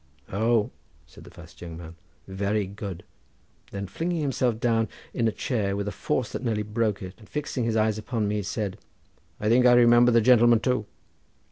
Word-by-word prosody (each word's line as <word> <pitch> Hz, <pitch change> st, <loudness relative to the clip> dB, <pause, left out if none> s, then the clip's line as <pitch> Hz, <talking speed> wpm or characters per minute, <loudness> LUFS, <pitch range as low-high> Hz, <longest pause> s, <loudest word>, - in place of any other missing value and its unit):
"Oh!" 110 Hz, +3 st, +1 dB, 0.3 s
said -, -, -16 dB
the -, -, -12 dB
fast -, -, -15 dB
young 85 Hz, -2 st, -7 dB
man; 85 Hz, 0 st, -10 dB, 0.3 s
"very 100 Hz, +2 st, -1 dB
good!" 100 Hz, -2 st, -7 dB, 0.7 s
then 100 Hz, 0 st, -5 dB
flinging 165 Hz, -, -3 dB
himself 125 Hz, -5 st, 0 dB
down 115 Hz, -2 st, +1 dB, 0.3 s
in 115 Hz, -2 st, +1 dB
a -, -, +1 dB
chair 105 Hz, -5 st, -2 dB
with 100 Hz, 0 st, -3 dB
a -, -, -2 dB
force 125 Hz, +1 st, -2 dB
that -, -, -5 dB
nearly 110 Hz, -3 st, -1 dB
broke 105 Hz, -1 st, -1 dB
it 95 Hz, 0 st, -7 dB
and 110 Hz, -, -17 dB
fixing 145 Hz, -5 st, -3 dB
his 115 Hz, -1 st, 0 dB
eyes 110 Hz, 0 st, +1 dB
upon 110 Hz, 0 st, -2 dB
me 105 Hz, 0 st, -1 dB
said, 100 Hz, 0 st, -4 dB, 0.6 s
"I 105 Hz, -, -2 dB
think 125 Hz, +3 st, +5 dB
I 120 Hz, -, +7 dB
remember 120 Hz, 0 st, +6 dB
the 115 Hz, -, +5 dB
gentleman 120 Hz, 0 st, +5 dB
too. 125 Hz, -3 st, -1 dB
110 Hz, 190 wpm, -26 LUFS, 100-120 Hz, 0.7 s, I